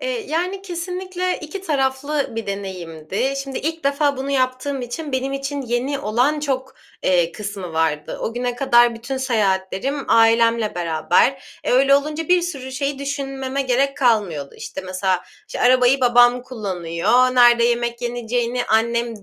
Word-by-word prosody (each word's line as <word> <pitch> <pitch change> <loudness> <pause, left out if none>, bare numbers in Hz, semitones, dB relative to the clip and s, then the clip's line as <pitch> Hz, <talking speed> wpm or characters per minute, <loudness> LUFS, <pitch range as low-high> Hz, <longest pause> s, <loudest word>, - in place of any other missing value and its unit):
Eee, - - -3
yani, 360 +5 -2
kesinlikle 365 0 -3
2 320 +5 -7
taraflı 280 -2 0
bir 225 -2 -4
deneyimdi. 190 - -4
Şimdi 270 -1 -5
ilk 320 0 -4
defa 280 0 +1
bunu 270 +1 -4
yaptığım 260 0 -1
için 280 +5 -6
benim 260 +1 -1
için 275 +1 -3
yeni 255 +3 -1
olan 260 +6 +1
çok, 265 -2 -3 0.3
eee, 175 -2 +2
kısmı 200 -3 -6
vardı. 160 -2 -1
O 225 - -3
güne 245 0 -2
kadar 240 -2 +4
bütün 240 +4 -5
seyahatlerim 225 +1 -1
ailemle 230 -1 +4
beraber. 175 +10 0
E, - - 0
öyle 270 +2 +5
olunca 305 +3 -1
bir 360 0 +4
sürü 275 -7 -5
şeyi 275 +1 -2
düşünmeme 275 -1 -3
gerek 270 +2 +1
kalmıyordu. 205 - 0
İşte, - - -7
mesela, 185 0 -1 0.3
işte, - - -6
arabayı 255 +1 +4
babam 245 0 +5
kullanıyor, 215 +1 0
nerede 240 -1 +6
yemek 235 0 0
yeneceğini 240 0 -2
annem 230 0 0
250 Hz, 145 wpm, -21 LUFS, 225-275 Hz, 0.3 s, nerede